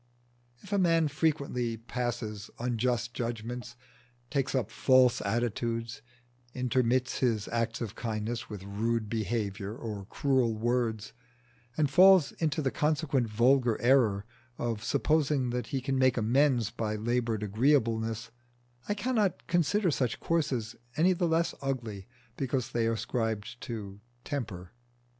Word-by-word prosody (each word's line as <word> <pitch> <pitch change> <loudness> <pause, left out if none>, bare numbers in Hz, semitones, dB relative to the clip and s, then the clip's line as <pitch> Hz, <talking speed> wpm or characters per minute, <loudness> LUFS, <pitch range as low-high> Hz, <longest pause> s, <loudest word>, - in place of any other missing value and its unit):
If 200 - -7
a 200 - +3
man 165 -4 +3
frequently 140 -6 -1
passes 115 -3 -4
unjust 120 0 -1
judgments, 120 +1 -4 0.6
takes 135 -2 0
up 130 - -1
false 130 -1 +4
attitudes, 115 +1 -2 0.5
intermits 125 0 +1
his 115 -5 +1
acts 115 0 -1
of 110 -3 -3
kindness 115 +1 -3
with 105 -3 -7
rude 110 +2 -1
behaviour 105 -2 -2
or 105 -4 -6
cruel 130 -5 +1
words, 115 -2 -1 0.6
and 155 -2 +3
falls 185 +2 +6
into 155 -2 -1
the 135 - +1
consequent 145 -4 +1
vulgar 120 +1 +3
error 120 -6 +3 0.3
of 115 -3 -2
supposing 145 -5 +1
that 125 -1 -2
he 135 - -2
can 135 0 -1
make 130 -1 +3
amends 120 0 +2
by 110 -3 -2
laboured 115 0 -1
agreeableness, 115 -1 +1 0.6
I 205 - +1
cannot 215 -3 0
consider 175 +2 +2
such 125 -5 -1
courses 135 -9 -1 0.2
any 180 +4 +4
the 175 0 0
less 165 +1 +1
ugly 115 -8 -4 0.3
because 130 -1 -1
they 115 -2 +1
are 115 - +1
ascribed 115 0 -3
to 105 -6 -6 0.2
"temper." 100 -11 -5
120 Hz, 130 wpm, -30 LUFS, 110-135 Hz, 0.6 s, falls